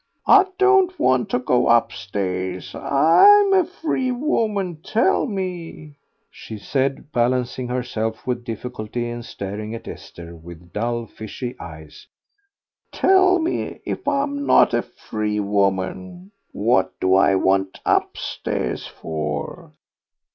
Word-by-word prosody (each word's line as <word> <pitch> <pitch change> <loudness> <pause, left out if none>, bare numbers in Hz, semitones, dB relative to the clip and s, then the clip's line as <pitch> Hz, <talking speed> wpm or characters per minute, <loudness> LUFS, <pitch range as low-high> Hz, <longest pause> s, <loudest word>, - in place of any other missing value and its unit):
I 390 -2 +6
don't 385 -2 +4
want 130 -1 +2
to - - +1
go 125 0 +1
upstairs. 95 -4 -1
I'm 390 - +5
a 375 -1 +5
free 315 -8 -2
woman; 215 - -1
tell 220 +9 +1
me," 175 - -6 0.3
she 110 - -9
said, 135 +6 -2
balancing 125 0 0
herself 120 -3 -3
with 125 -1 -2
difficulty 120 0 -5
and 120 0 -6
staring 105 +2 -6
at 115 - -10
Esther 85 0 -10
with 85 +1 -13
dull, 120 +2 -2
fishy 120 +3 -7
eyes, 80 -2 -11 0.8
"tell 375 -1 +4
me 335 0 -3
if - - -5
I'm 285 0 0
not - - +5
a - - +2
free 105 -1 -4
woman? 100 - -2 0.2
What 95 -4 0
do 95 0 +2
I 95 0 +4
want 95 0 +1
upstairs - - -2
for?" 75 -2 -5
120 Hz, 120 wpm, -21 LUFS, -, 0.8 s, I